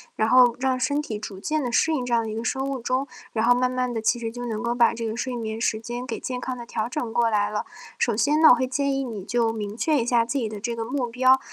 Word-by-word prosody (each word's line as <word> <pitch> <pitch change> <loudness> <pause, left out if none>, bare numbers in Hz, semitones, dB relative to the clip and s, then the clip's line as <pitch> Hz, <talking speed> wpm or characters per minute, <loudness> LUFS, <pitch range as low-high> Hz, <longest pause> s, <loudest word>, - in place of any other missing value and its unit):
然 220 +1 +1
后 250 -1 +6
让 260 0 0
身 285 +3 +1
体 215 -8 -5
逐 195 -3 -7
渐 310 +7 -1
地 245 - -2
适 320 +7 +3
应 255 -5 -1
这 240 - -2
样 230 - +3
的 220 - -5
一 215 - -5
个 225 - -4
生 265 +2 -1
物 275 -1 -3
钟， 255 +3 -1 0.3
然 225 0 +1
后 245 - +6
慢 250 +1 +1
慢 255 -1 -1
地 225 - -2
其 225 - +2
实 230 -1 -4
就 245 +1 -6
能 220 0 -3
够 235 - 0
把 240 -1 +3
这 230 0 -4
个 220 - -3
睡 245 +1 -3
眠 220 -1 -4
时 220 - +1
间 240 +2 -6
给 230 - -4
健 250 -1 -4
康 255 -1 -4
地 240 - -8
调 225 0 -3
整 245 -7 -4
过 235 -1 +3
来 205 -2 +1
了。 210 - -2 0.3
首 235 - +1
先 295 +7 +2
呢， 315 - +9
我 245 - +8
会 260 - 0
建 280 +2 -1
议 270 - -1
你 220 -7 -6
就 235 +2 +1
明 210 0 -5
确 300 -2 +2
一 230 - -2
下 235 -2 +3
自 275 +4 -1
己 225 -3 -2
的 215 - -7
这 235 +3 -3
个 225 - -3
目 255 +2 -2
标， 255 +2 +4
240 Hz, 335 characters per minute, -24 LUFS, 225-255 Hz, 0.3 s, 呢